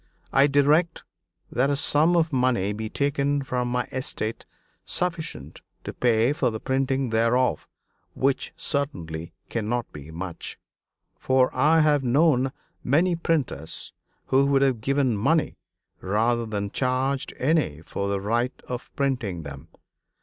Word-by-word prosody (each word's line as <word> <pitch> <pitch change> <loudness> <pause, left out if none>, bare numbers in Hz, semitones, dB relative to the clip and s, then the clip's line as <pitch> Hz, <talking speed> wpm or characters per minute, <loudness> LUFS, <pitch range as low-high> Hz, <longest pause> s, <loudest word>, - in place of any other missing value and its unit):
I 135 +1 +6
direct 150 +4 +2 0.5
that 125 +4 +2
a 145 - +2
sum 150 +4 +3
of 160 -2 +1
money 125 -6 +1
be 110 +1 -5
taken 140 +1 0
from 125 -2 -2
my 125 0 0
estate 115 -4 -4 0.4
sufficient 165 - -3 0.2
to - - -6
pay 120 +2 +2
for 135 -4 +1
the 110 -1 -5
printing 130 -1 0
thereof, 115 -3 +2 0.5
which 135 0 0
certainly 90 - -2 0.2
cannot 115 +1 -2
be 75 +1 -10
much; 85 +1 -6 0.6
for 130 -1 +2
I 155 +5 +4
have 150 -2 +3
known 135 0 +3 0.3
many 170 +7 +2
printers 145 - -2 0.3
who 135 +1 +3
would 140 -1 +3
have 130 -5 +1
given 135 -1 +1
money 155 +10 +1 0.4
rather 115 +4 0
than 100 -2 -3
charged 130 +1 -1
any 130 - +1
for 100 +4 -3
the 100 0 0
right 120 +6 -1
of 125 -1 -5
printing 120 - -1
them. 70 -2 -9
130 Hz, 135 wpm, -25 LUFS, 110-140 Hz, 0.6 s, I